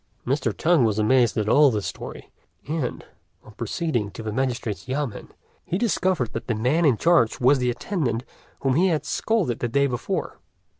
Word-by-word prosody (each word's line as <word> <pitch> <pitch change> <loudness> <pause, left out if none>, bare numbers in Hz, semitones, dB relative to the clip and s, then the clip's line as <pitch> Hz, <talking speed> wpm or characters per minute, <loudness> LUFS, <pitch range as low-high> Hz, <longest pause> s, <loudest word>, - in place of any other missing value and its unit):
Mr. 135 +4 0
Tung 165 -5 +2
was 110 -2 +1
amazed 120 +3 +3
at 105 -1 0
all 145 +5 +6
this 105 -5 -2
story, - - -7 0.4
and, 150 -5 -3 0.4
on 110 - -14
proceeding 120 - -2
to 110 - -9
the 110 - -3
magistrate's 120 -3 -2
yamên, 130 -4 -3 0.3
he 180 - -2
discovered 185 - 0
that 115 - -5
the 120 - 0
man 130 +10 +1
in 130 -6 +4
charge 165 -8 +3
was 130 +2 +4
the 125 0 +1
attendant 125 - -2 0.4
whom 135 -1 +1
he 175 +7 +3
had 160 -4 0
scolded 195 - 0
the 120 - -1
day 140 +4 +2
before. 125 -3 -3
130 Hz, 180 wpm, -24 LUFS, 115-155 Hz, 0.4 s, all